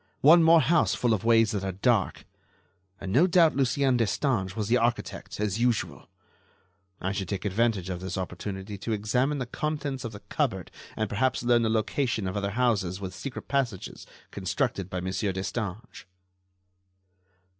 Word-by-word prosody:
One 165 +4 +8
more 165 0 +6
house 170 +1 +2
full 120 -2 +1
of 105 - -1
ways 115 -2 +4
that 100 -3 -2
are 95 - -2
dark! 105 0 0 0.7
And 95 - -5
no 150 - +5
doubt 170 -5 +4
Lucien 135 -1 +2
Destange 110 -4 0
was 105 -3 -2
the 120 +3 +3
architect, 120 -3 -2
as 105 0 -1
usual!... 120 -2 -1 0.9
I 95 - -2
should 95 -2 -4
take 100 0 -3
advantage 105 -2 +1
of 90 -2 -4
this 95 0 -5
opportunity 95 +2 -5
to 110 +3 -2
examine 125 +7 0
the 130 - -3
contents 145 0 -3
of 115 - -5
the 105 - -10
cupboard - - -2 0.3
and 110 - 0
perhaps 120 +5 0
learn 120 -1 +4
the 115 - +1
location 110 0 0
of 95 - -4
other 100 -1 -1
houses 100 -7 +1
with 95 -2 -6
secret 125 +8 -7
passages 130 -9 -2 0.2
constructed 100 0 -2
by 90 -1 -3
Monsieur 95 +2 -1
Destange." 100 +3 -5
110 Hz, 165 wpm, -27 LUFS, 95-125 Hz, 0.9 s, One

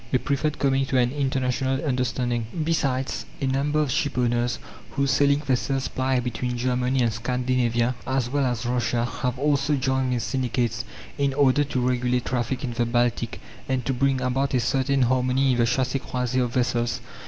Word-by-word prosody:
They 130 - +3
preferred 145 +3 -1
coming 135 -1 +1
to 135 - +1
an 125 -1 +3
international 130 -2 0
understanding. 125 -3 -1 0.2
Besides, 135 -5 -1
a 135 - -1
number 140 +3 +1
of 150 -4 +1
shipowners, 120 -3 0 0.3
whose 140 -1 0
sailing 140 +1 +3
vessels 135 -1 -1
ply 130 0 0
between 125 0 -3
Germany 125 +1 +1
and 115 -2 +1
Scandinavia, 125 0 0
as 130 -2 0
well 140 +3 0
as 120 -1 -2
Russia, 120 -1 0 0.2
have 125 0 -1
also 145 +1 +2
joined 130 -1 0
these 120 -2 -1
syndicates, 120 -3 -1 0.3
in 140 -1 +1
order 145 0 +4
to 125 -3 -1
regulate 125 -1 0
traffic 125 +1 -2
in 120 -3 -3
the 120 0 0
Baltic, 120 -1 0 0.3
and 130 -2 0
to 135 - 0
bring 135 +1 +1
about 130 +2 0
a - - +3
certain 135 +2 +1
harmony 130 +2 +2
in 125 - 0
the 120 - +4
chassé 130 +2 0
croisé 125 0 -1
of 120 - -2
vessels. 120 -1 0
130 Hz, 175 wpm, -25 LUFS, 120-135 Hz, 0.3 s, order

